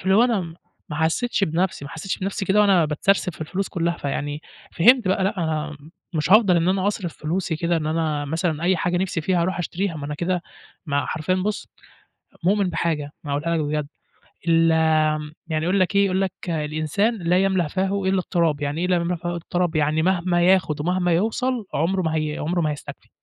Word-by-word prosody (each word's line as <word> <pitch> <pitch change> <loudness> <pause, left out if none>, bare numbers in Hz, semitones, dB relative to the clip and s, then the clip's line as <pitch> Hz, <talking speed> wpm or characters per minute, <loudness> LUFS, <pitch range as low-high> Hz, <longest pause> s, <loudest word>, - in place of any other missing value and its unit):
فاللي 190 +1 +2
هو 230 +4 +6
أنا 230 -6 +1
م 165 -2 -7 0.3
ما 150 - -5
حسيتش 195 +7 +1
بنَفسي، 170 -2 -1
ما 140 - -8
حسيتش 175 +4 -4
بنَفسي 195 +1 -3
كده 195 +3 +3
وأنا 195 -5 +5
باتسرسب 180 +5 +1
في - - -16
الفلوس 185 +5 -3
كلّها، 170 -1 -1
فيعني 145 +1 -3 0.3
فهمت 230 +3 +5
بقى 190 0 +1
لأ، 200 +2 0
أنا 155 -2 -2 0.4
مش 155 +1 -1
هافضل 200 -4 +6
إن 170 +1 +2
أنا 190 +1 +1
أصرف 190 -5 -2
فلوسي 165 +1 -2
كده، 170 0 0
إن 155 - -2
أنا 155 -2 -1
مثلًا 160 +1 -2
أي 180 +1 +3
حاجة 175 +1 0
نِفسي 180 -2 -1
فيها 175 +1 +1
أروح 185 +1 -1
أشتريها، 180 +1 -2
ما 145 -1 -5
أنا 150 - -4
كده 175 +3 -1 0.4
ما 145 -1 0
حرفيًا 160 +4 -1
بُصّ، 200 +3 -2 0.8
مؤمِن 195 -1 +2
بحاجة 155 -4 -2
أنا 145 - -4
هاقولها 165 +3 0
لك - - 0
بجد، 150 -1 -2 0.6
ال 165 0 +4 0.8
يعني 155 -1 -1
يقول 185 +3 +2
لك 185 +2 +1
إيه، 200 - +5
يقول 190 -1 +1
لك 190 -2 0 0.2
"الإنسان 155 +8 0
لا 180 0 +2
يملأ 190 -4 +1
فاهُ 195 +3 -1
إلّا 190 0 +2
التراب"، 170 -5 0
يعني 145 +3 -2
إيه 180 - +1
لا 180 0 +2
يملأ 170 +1 -1
فاهُ 175 +1 -5
إلّا 175 - -3
التراب؟ 175 -1 -1
يعني 155 +1 +2
مهما 175 -1 +1
ياخد 180 -5 +3
ومهما 180 +1 +1
يوصَل 225 +6 0
عمره 185 +5 +1
ما 160 -1 -1
هي 155 -1 -1
عمره 175 +3 -1
ما 155 -2 +1
هيستكفي، 145 - -8
175 Hz, 205 wpm, -23 LUFS, 155-190 Hz, 0.8 s, هو